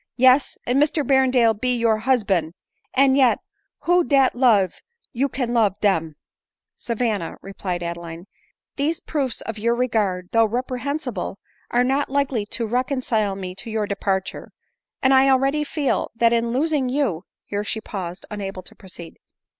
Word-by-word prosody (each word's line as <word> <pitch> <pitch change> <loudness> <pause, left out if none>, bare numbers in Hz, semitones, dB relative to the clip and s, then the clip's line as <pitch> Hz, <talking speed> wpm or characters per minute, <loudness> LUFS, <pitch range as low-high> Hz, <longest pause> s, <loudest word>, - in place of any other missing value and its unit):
" - - -69 0.2
Yes, 265 +2 0
and 255 +3 +2
Mr 300 -1 +1
Berrendale 255 -3 +4
be 250 +4 0
your 230 -2 +2
husban; 200 -9 +1 0.4
and 265 0 +4
yet, 255 -5 +4 0.4
who 350 +4 +3
dat 275 -4 +3
love 220 -8 +3 0.4
you 275 +3 0
can 245 -2 -2
love 215 -5 +2
dem 165 -7 +1 0.2
?" - - -67
" - - -68
Savanna," 225 -7 -2
replied 185 -2 -4
Adeline, 170 0 -6 0.3
" - - -69
these 310 +4 0
proofs 280 -10 -3
of 225 -1 -6
your 235 +2 +1
regard, 210 -7 0
though 230 0 +4
reprehensible, 250 - -3 0.3
are 245 +1 +2
not 270 +3 0
likely 270 -6 0
to 230 +2 -3
reconcile 240 -4 0
me 185 -2 -6
to 190 - -6
your 220 -1 -1
departure; 195 -1 -3 0.5
and 265 0 +5
f 265 +1 +5
already 275 +3 +2
feel 290 -2 -1
that 230 0 +3
in 235 0 +1
losing 280 0 +1
you 250 - -1
" - - -70
here 205 0 -3
she 215 +1 -3
paused, 185 -4 -6
unable 195 -3 -5
to - - -12
proceed. 175 -4 -12
235 Hz, 165 wpm, -22 LUFS, 200-265 Hz, 0.5 s, and